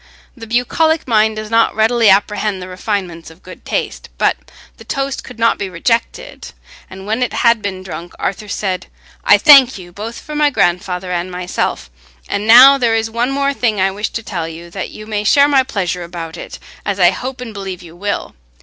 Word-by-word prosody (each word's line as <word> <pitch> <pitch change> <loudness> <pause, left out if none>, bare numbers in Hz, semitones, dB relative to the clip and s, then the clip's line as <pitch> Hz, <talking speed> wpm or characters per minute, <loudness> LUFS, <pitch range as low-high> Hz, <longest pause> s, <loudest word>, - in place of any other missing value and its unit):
The 230 -3 -10
bucolic 305 +8 +1
mind 220 -2 +2
does 215 0 -7
not 230 0 +3
readily 225 0 +3
apprehend 205 0 +1
the 180 - -8
refinements 185 -3 -4
of 165 +3 -18
good 185 - -12
taste. - - -3
But - - +2 0.4
the - - -13
toast 275 0 -3
could 250 - -12
not 230 0 +2
be 200 - -3
rejected 230 +7 -3 0.4
and 190 +1 -10
when 220 +4 -2
it 250 - -1
had 235 -1 +4
been 190 -2 -5
drunk, 175 -2 -8
Arthur 210 +2 -4
said, 190 -2 -3 0.4
"I - - +6
thank 270 -5 +7
you, 175 -2 -12
both 215 +6 -7
for 300 - -9
my 295 0 +3
grandfather 180 -4 -1
and 175 +1 -2
myself; 180 - -3 0.4
and 205 +2 -3
now 260 +4 +9
there 230 -3 +2
is 225 0 -1
one 235 +3 0
more 280 +1 0
thing 225 -6 0
I 190 +1 +2
wish 205 +2 -3
to 230 - -4
tell 175 -7 -4
you, 170 +1 -10
that 190 +1 -5
you 215 - -10
may 210 -1 -3
share 280 +7 +5
my 280 -2 +4
pleasure 195 -9 -3
about 170 -1 -7
it, - - -9 0.3
as 200 -1 -3
I 175 -1 +6
hope 255 +6 -6
and 240 -3 -7
believe 195 -3 -7
you 170 -1 -13
will. 205 +3 -4
210 Hz, 205 wpm, -16 LUFS, 185-235 Hz, 0.4 s, now